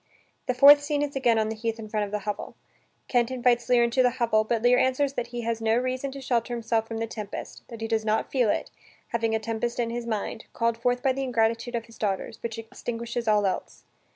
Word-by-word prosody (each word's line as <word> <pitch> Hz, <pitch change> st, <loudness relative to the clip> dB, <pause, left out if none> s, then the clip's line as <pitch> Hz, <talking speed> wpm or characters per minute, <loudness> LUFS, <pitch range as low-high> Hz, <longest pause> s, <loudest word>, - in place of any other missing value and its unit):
The 255 Hz, -, 0 dB
fourth 285 Hz, +3 st, +9 dB
scene 290 Hz, 0 st, 0 dB
is 285 Hz, -1 st, -4 dB
again 240 Hz, -4 st, +3 dB
on 220 Hz, 0 st, +1 dB
the 220 Hz, -, -3 dB
heath 225 Hz, +1 st, -3 dB
in 220 Hz, -1 st, -8 dB
front 210 Hz, -1 st, -1 dB
of -, -, -12 dB
the 210 Hz, -1 st, -3 dB
hovel. 210 Hz, -1 st, -4 dB, 0.5 s
Kent 240 Hz, -2 st, +2 dB
invites 245 Hz, -1 st, +1 dB
Lear 245 Hz, -1 st, +5 dB
into 235 Hz, +2 st, +2 dB
the 250 Hz, -, +5 dB
hovel, 220 Hz, -2 st, +3 dB
but 225 Hz, +1 st, -1 dB
Lear 250 Hz, +1 st, +5 dB
answers 270 Hz, +2 st, +1 dB
that 245 Hz, -3 st, -3 dB
he 240 Hz, 0 st, -5 dB
has 230 Hz, -1 st, -2 dB
no 225 Hz, +1 st, +2 dB
reason 255 Hz, +2 st, -1 dB
to 275 Hz, -, -8 dB
shelter 240 Hz, -2 st, 0 dB
himself 225 Hz, -1 st, -1 dB
from 225 Hz, -, -5 dB
the 225 Hz, -, -1 dB
tempest, 215 Hz, -2 st, -7 dB
that 230 Hz, -2 st, -10 dB
he 225 Hz, -, -2 dB
does 220 Hz, -1 st, 0 dB
not 215 Hz, 0 st, 0 dB
feel 250 Hz, -5 st, +2 dB
it, -, -, -1 dB, 0.4 s
having 225 Hz, -1 st, 0 dB
a -, -, +1 dB
tempest 230 Hz, +2 st, -3 dB
in 230 Hz, -1 st, 0 dB
his 235 Hz, 0 st, -4 dB
mind, 220 Hz, 0 st, -3 dB
called 230 Hz, -1 st, +1 dB
forth 245 Hz, +1 st, 0 dB
by 265 Hz, -, +3 dB
the 270 Hz, -, -3 dB
ingratitude 235 Hz, -1 st, 0 dB
of 230 Hz, -1 st, -3 dB
his 230 Hz, 0 st, -17 dB
daughters, 195 Hz, -3 st, -2 dB
which 230 Hz, -1 st, -4 dB
extinguishes 230 Hz, 0 st, -5 dB
all 210 Hz, -1 st, +3 dB
else. 190 Hz, -, -3 dB
235 Hz, 240 wpm, -26 LUFS, 225-245 Hz, 0.5 s, fourth